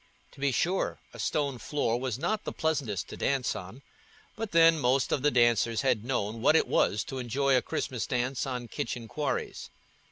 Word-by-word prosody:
To - - -17
be 140 0 +1
sure, 180 +9 0 0.2
a - - -11
stone 140 -4 -1
floor 120 -5 -1
was 125 -3 -2
not 195 +9 -1
the - - -4
pleasantest 140 - -1
to - - -8
dance 135 -2 0
on, 105 +8 -9 0.5
but 225 -1 -4
then, 165 -1 +6
most 130 0 +2
of 140 - +1
the 150 - +4
dancers 120 -2 +3
had 120 -5 +2
known 115 -3 -2
what 155 - +5
it - - +4
was 105 - +2
to 135 - -6
enjoy 135 +3 +1
a 125 - +4
Christmas 125 -3 -3
dance 125 +1 -1
on 125 -2 -4
kitchen 115 +1 -4
quarries. 145 +4 -3
130 Hz, 190 wpm, -29 LUFS, 120-145 Hz, 0.5 s, then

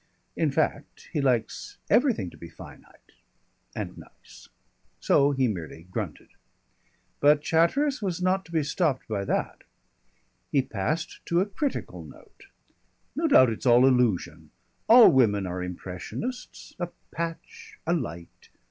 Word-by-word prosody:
In 160 - +1
fact, 145 0 -2
he 150 - 0
likes 125 -4 -1
everything 240 - +2
to - - -15
be 85 - -10
finite - - -15 0.6
and - - -5
nice. - - -16 0.5
So 140 0 +3
he 135 -2 +1
merely 85 -6 -6
grunted. - - -5 0.9
But 145 +1 +4
Chatteris 245 - +2
was 185 -4 -2
not 185 +1 +1
to - - -16
be 160 -2 +1
stopped 150 -2 -1
by 100 -3 -2
that. - - -2 0.9
He 140 -2 +3
passed 135 +10 -3
to 170 - +2
a 190 - +2
critical 265 +8 -4
note. 405 -3 -16 0.7
"No 325 +2 +1
doubt 130 - +6
it's 110 - -4
all 120 +1 +6
illusion. 125 -8 +1 0.4
All 235 0 +9
women 105 -7 +3
are 90 0 -4
impressionists, 90 - -7
a 175 - -2 0.2
patch, 430 - -6
a 170 - +1
light. 85 - -6
145 Hz, 135 wpm, -26 LUFS, 110-185 Hz, 0.9 s, All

